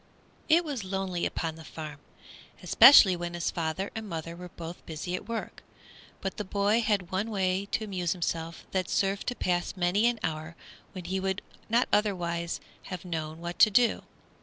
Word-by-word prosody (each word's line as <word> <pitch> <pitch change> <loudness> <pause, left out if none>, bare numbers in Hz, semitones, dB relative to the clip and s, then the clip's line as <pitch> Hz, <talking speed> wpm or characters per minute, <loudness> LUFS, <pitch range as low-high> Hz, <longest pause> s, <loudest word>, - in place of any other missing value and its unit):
It 335 +2 +5
was 275 -8 -3
lonely 190 -2 -2
upon 165 -2 -3
the 160 - -10
farm, 155 -2 -8 0.6
especially 205 -9 +9
when 175 0 -5
his 170 - -1
father 165 +4 -2
and 220 -2 -6
mother 165 0 -5
were 180 +1 -9
both 170 0 -9
busy 160 +3 -5
at 180 - -5
work, 230 -1 -5 0.6
but 195 - -4
the 210 - -2
boy 205 +3 +2
had 205 -5 0
one 195 +4 -1
way 190 -1 0
to 220 - -1
amuse 185 -5 -1
himself 165 -2 -3
that 185 -2 -1
served 195 0 0
to 245 - -1
pass 180 -1 -1
many 185 +5 +3
an 240 -1 0
hour 160 +1 -3 0.4
when 185 -2 -7
he 190 +2 -1
would 190 +1 -2 0.3
not 235 +3 +3
otherwise 175 -5 0 0.3
have 185 -1 -7
known 160 -2 -4
what 175 +1 -6
to 215 - +8
do. 235 +3 +3
185 Hz, 180 wpm, -29 LUFS, 170-205 Hz, 0.6 s, especially